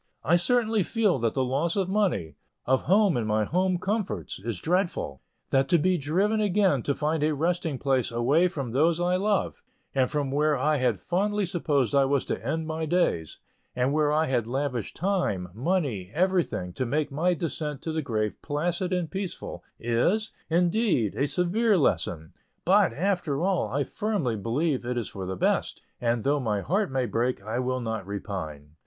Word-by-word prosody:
I 165 - +4
certainly 220 +4 +2
feel 200 - +1
that 115 -1 0
the 130 - +2
loss 140 +7 0
of 195 -3 +1
money, 185 - 0 0.3
of 130 +1 +1
home 200 -1 +4
and 115 -3 -1
my 110 0 +2
home 185 - +1
comforts, 200 +3 -3
is 105 -1 -4
dreadful, 170 - -1 0.3
that 135 0 +3
to 175 - +5
be 185 +4 +2
driven 195 +10 +1
again 195 - +2
to 140 +4 -1
find 155 +1 0
a 150 0 +2
resting 165 -1 -1
place 130 -3 +1
away 135 +10 +3
from 140 -9 -4
those 160 +6 +3
I 180 +1 +2
love, 205 +1 0 0.3
and 130 -2 +2
from 145 -3 -1
where 150 +1 +2
I 150 +4 +2
had 125 -7 +1
fondly 205 - 0
supposed 145 - 0
I 140 -1 +5
was 140 0 +1
to 95 - -3
end 160 +6 -2
my 160 0 -3
days, 150 - 0 0.4
and 125 +2 +1
where 150 -1 +2
I 155 +1 +2
had 125 -6 0
lavished 125 -2 -2
time, 175 - -1
money, 125 - -1
everything, 175 - 0
to 130 - -2
make 150 +4 0
my 175 +6 +1
descent 150 -3 -4
to 160 - -2
the 160 0 -1
grave 110 -6 -1
placid 175 +5 -1
and 180 -3 -1
pleasant, 195 -2 -5 0.2
is, 170 - +1 0.2
indeed, 175 - +2
a 140 - 0
severe 200 +6 +2
lesson; 80 - 0 0.3
but, - - +5
after 175 -1 -1
all, 190 -1 +1
I 145 +2 +1
firmly 200 - -1
believe 130 +7 -1
it 125 +1 -2
is 115 - -2
for 95 -2 -6
the 95 - -3
best, - - 0 0.2
and 120 -2 0
though 145 +1 +2
my 105 -6 -1
heart 195 - 0
may 130 -1 0
break, 120 0 -1
I 110 +4 -2
will 130 0 -1
not 110 -4 -4
repine. 80 -8 -6
150 Hz, 185 wpm, -27 LUFS, 120-180 Hz, 0.4 s, to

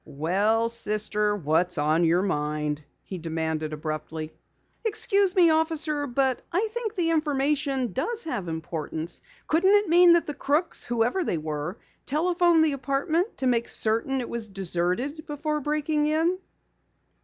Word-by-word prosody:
"Well, 200 +10 +1
sister, 210 -2 -1
what's 175 0 0
on 155 +3 +2
your 175 +3 +3
mind?" 150 -4 -2 0.2
he 185 - -7
demanded 160 -1 -3
abruptly. 155 +1 -5 0.5
"Excuse 400 -3 +2
me, 345 -3 +6
officer, 315 -2 +1
but 260 0 +1
I 395 +6 0
think 455 -2 -4
the 335 -3 +1
information 280 - 0
does 465 - 0
have 210 - -3
importance. 160 0 -4 0.2
Couldn't 380 +6 +4
it 410 -3 +2
mean 350 +1 +7
that 340 - +3
the 295 - -4
crooks, 295 +5 -1
whoever 240 +10 0
they 175 - -1
were, 155 +4 -4 0.3
telephoned 340 +2 +3
the 305 - +1
apartment 280 - -1
to 265 - -2
make 235 -2 +2
certain 230 +5 +1
it 240 - -5
was 230 -2 -5
deserted 195 - -1
before 300 0 -2
breaking 300 +1 0
in?" 325 +4 +1
260 Hz, 145 wpm, -26 LUFS, -, 0.5 s, mean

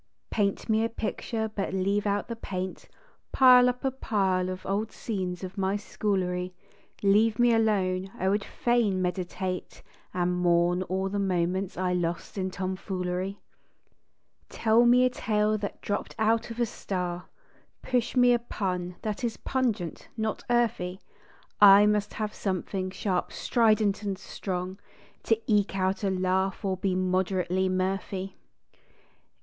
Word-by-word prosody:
Paint 200 -2 0
me 220 0 +2
a 230 - 0
picture 225 0 -3
but 200 -3 -3
leave 200 +2 +1
out 205 0 0
the 230 - -4
paint, 185 -4 -5 0.4
Pile 250 -1 +7
up 250 +1 -4
a 265 - +2
pile 190 -7 0
of 185 0 -6
old 210 +3 -1
scenes 185 -5 -4
of 185 +2 -6
my 190 +1 +1
schoolery, 185 -3 -2 0.5
Leave 210 +2 +4
me 240 -1 +4
alone; 195 -4 +1
I 190 - -1
would 200 +1 +1
fain 235 -6 +1
meditate 180 0 -3 0.3
And 180 0 0
mourn 175 0 +2
o 190 +1 -1
er - - -1
the 200 +1 -2
moments 185 0 -1
I 180 0 0
lost 175 -1 -2
in 190 -2 -1
tomfoolery. 185 0 -3 1.1
Tell 230 +2 +3
me 250 +1 +6
a - - +4
tale 215 -3 +1
that 205 - -5
dropped 205 - -3
out 225 +1 +1
of 230 +1 -7
a 240 - +3
star, 180 -5 -4 0.6
Push 250 -1 0
me 245 -1 +6
a 240 - +2
pun 180 -6 -3
that 215 +2 -3
is 230 -2 -1
pungent, 225 - -2
not 220 -1 -2
earthy. 205 -6 +1 0.6
I 205 0 +9
must 210 -1 +1
have 215 -1 -3
something 185 0 -2
sharp, 185 -1 -2
strident, 215 -3 +2
and 200 -2 -3
strong 185 0 -5 0.5
To 225 -1 +2
eke 205 -2 +2
out 190 +2 0
a 195 - +2
laugh 190 +1 0
or 190 -1 +1
be 185 0 -1
moderately 185 0 0
mirthy. 190 +1 -2
195 Hz, 145 wpm, -27 LUFS, 185-220 Hz, 1.1 s, I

